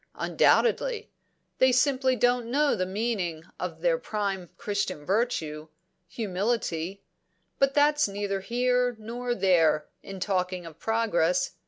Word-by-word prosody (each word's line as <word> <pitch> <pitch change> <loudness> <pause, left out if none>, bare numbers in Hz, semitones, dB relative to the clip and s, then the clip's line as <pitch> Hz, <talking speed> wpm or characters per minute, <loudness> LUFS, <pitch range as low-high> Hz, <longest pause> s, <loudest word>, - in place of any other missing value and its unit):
"Undoubtedly. 470 -1 +2 0.5
They 260 0 +5
simply 260 0 +2
don't 245 0 +1
know 290 +3 +2
the 185 -2 -1
meaning 190 -6 -2 0.2
of - - -5
the - - +2
prime 200 - -3
Christian 200 -7 -3
virtue 165 -7 -1 0.4
humility. 195 -3 -2 0.6
But 275 0 +3
that's 295 -1 +4
neither 200 0 -2
here 245 +4 +1
nor 240 +3 -4
there, 165 -7 +3
in 195 -1 -8
talking 185 -2 -1
of 165 -1 -11
progress. 180 -6 +1
210 Hz, 120 wpm, -27 LUFS, 185-250 Hz, 0.6 s, They